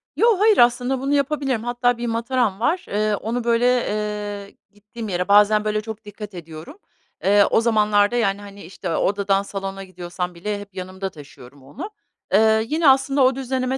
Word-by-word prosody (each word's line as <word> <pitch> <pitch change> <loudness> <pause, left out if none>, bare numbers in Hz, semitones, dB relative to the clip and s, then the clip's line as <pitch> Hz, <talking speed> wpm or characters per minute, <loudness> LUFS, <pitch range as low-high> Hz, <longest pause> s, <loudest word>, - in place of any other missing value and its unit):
Yo, 455 -4 +3
hayır, 425 0 +4
aslında 245 +2 +3
bunu 275 +2 -1
yapabilirim. 280 -4 0
Hatta 245 0 0
bir 240 0 -4
mataram 230 -3 -1
var, 325 +9 0
eee, 210 +1 0
onu, 230 +4 -3
böyle, 235 0 +2
eee, 210 -4 -2 0.2
gittiğim 210 +2 -9
yere 180 0 -2
bazen, 210 +1 +5
böyle, 215 0 0
çok 220 0 -8
dikkat 205 0 -9
ediyorum. 165 - -10 0.5
Eee, 200 +1 +5
o - - +4
zamanlarda, 210 -1 +2
yani, 205 -4 0
hani, 200 0 -11
işte, 175 -1 -5
odadan 200 0 +1
salona 195 -1 -6
gidiyorsam 180 -1 -6
bile 205 +4 -4
hep 200 -1 -12
yanımda 190 +1 -5
taşıyorum 140 -3 -15
onu. 145 - -8 0.4
Eee, 220 +1 +4
yine 310 +1 +3
aslında 270 +1 +3
o 260 0 +3
düzenime 260 0 -2
210 Hz, 170 wpm, -21 LUFS, 195-245 Hz, 0.5 s, bazen